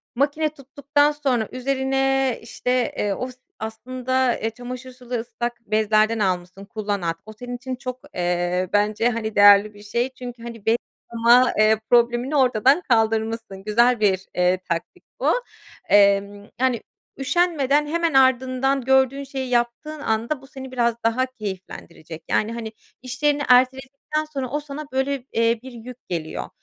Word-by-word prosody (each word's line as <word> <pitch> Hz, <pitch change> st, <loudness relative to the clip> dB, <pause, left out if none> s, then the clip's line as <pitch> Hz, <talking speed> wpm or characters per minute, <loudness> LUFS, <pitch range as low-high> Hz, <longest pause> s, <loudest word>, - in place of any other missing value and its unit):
makine 290 Hz, +4 st, +1 dB
tuttuktan 290 Hz, +1 st, 0 dB
sonra 265 Hz, -7 st, -1 dB
üzerine, 270 Hz, 0 st, 0 dB
işte, 250 Hz, +1 st, -1 dB
eee, 205 Hz, -1 st, 0 dB
os 255 Hz, +5 st, -5 dB, 0.2 s
aslında, 255 Hz, +3 st, -1 dB
eee, 225 Hz, -, -1 dB
çamaşır 250 Hz, +2 st, -8 dB
sulu 250 Hz, -1 st, -11 dB
ıslak 240 Hz, +1 st, -4 dB
bezlerden 215 Hz, +1 st, +3 dB
almışsın, 185 Hz, 0 st, -2 dB
kullan 205 Hz, -1 st, -3 dB
at. 165 Hz, -1 st, -1 dB
O 215 Hz, -, -10 dB
senin 245 Hz, +3 st, -7 dB
için 255 Hz, +1 st, -5 dB
çok, 255 Hz, 0 st, -6 dB, 0.2 s
eee, 180 Hz, +1 st, 0 dB
bence, 210 Hz, +3 st, +2 dB
hani, 220 Hz, -2 st, -3 dB
değerli 205 Hz, +1 st, +7 dB
bir 205 Hz, 0 st, -14 dB
şey. 235 Hz, +5 st, -1 dB
Çünkü, 245 Hz, -2 st, -9 dB
hani, 230 Hz, -3 st, -9 dB
bez 225 Hz, +1 st, +3 dB, 0.4 s
yıkama, 235 Hz, +2 st, +5 dB
eee, 215 Hz, 0 st, +4 dB
problemini 240 Hz, +4 st, +3 dB
ortadan 260 Hz, +3 st, +4 dB
kaldırmışsın. 225 Hz, -3 st, 0 dB
Güzel 235 Hz, +3 st, +3 dB
bir, 190 Hz, -2 st, +1 dB
eee, 180 Hz, +1 st, +3 dB
taktik 170 Hz, -1 st, -4 dB, 0.2 s
bu. -, -, 0 dB, 0.6 s
Emm, 200 Hz, 0 st, +3 dB
yani, 250 Hz, -3 st, +1 dB, 0.4 s
üşenmeden 295 Hz, -1 st, +1 dB
hemen 335 Hz, 0 st, 0 dB
ardından 260 Hz, +1 st, +3 dB
gördüğün 265 Hz, +2 st, +2 dB
şeyi 265 Hz, -2 st, -5 dB
yaptığın 245 Hz, +6 st, -1 dB
anda 235 Hz, +3 st, -1 dB
bu 270 Hz, -, -15 dB
seni 265 Hz, -2 st, -9 dB
biraz 235 Hz, -2 st, +1 dB
daha 235 Hz, +3 st, +2 dB
keyiflendirecek. 190 Hz, -8 st, -8 dB
Yani, 215 Hz, +2 st, +1 dB
hani, 225 Hz, -2 st, -5 dB, 0.3 s
işlerini 285 Hz, +4 st, 0 dB
erteledikten 265 Hz, +4 st, +2 dB
sonra 275 Hz, -5 st, -5 dB
o 295 Hz, -, -1 dB
sana, 295 Hz, +1 st, -7 dB
böyle, 265 Hz, 0 st, -1 dB
eee, 230 Hz, 0 st, +2 dB
bir 260 Hz, -, -9 dB
yük 245 Hz, +1 st, -11 dB
geliyor. 160 Hz, -3 st, -4 dB
245 Hz, 145 wpm, -22 LUFS, 215-265 Hz, 0.6 s, değerli